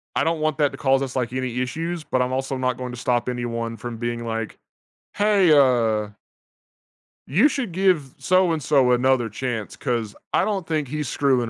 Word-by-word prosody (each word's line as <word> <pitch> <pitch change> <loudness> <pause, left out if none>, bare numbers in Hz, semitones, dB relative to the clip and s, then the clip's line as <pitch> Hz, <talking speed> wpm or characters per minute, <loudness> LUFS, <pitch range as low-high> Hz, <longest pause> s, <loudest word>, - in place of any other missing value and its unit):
I - - +2
don't 165 -1 0
want 155 -2 0
that 145 -2 +2
to - - -7
cause 135 0 +2
us, 135 -1 -4
like, 125 -2 -1
any 125 -1 -2
issues, 165 +6 -3
but 130 -3 0
I'm 125 0 -1
also 135 0 -2
not 130 -1 -1
going 125 -1 -5
to 120 - -8
stop 120 +1 0
anyone 115 -2 -3
from 115 +1 -6
being 120 0 -3
like, 115 -1 -4 0.6
"Hey, 200 -5 +3
uh" 115 -7 +3 1.2
you 185 - +4
should 265 -8 -3
give 175 -7 +1
so-and-so 150 -5 +2
another 125 -1 +2
chance, 115 -1 -4
'cause 115 -4 -2 0.2
I - - +3
don't 195 -5 -2
think 155 -4 -1
he's 150 0 -3
screwing 130 -4 +1
130 Hz, 185 wpm, -23 LUFS, 120-155 Hz, 1.2 s, you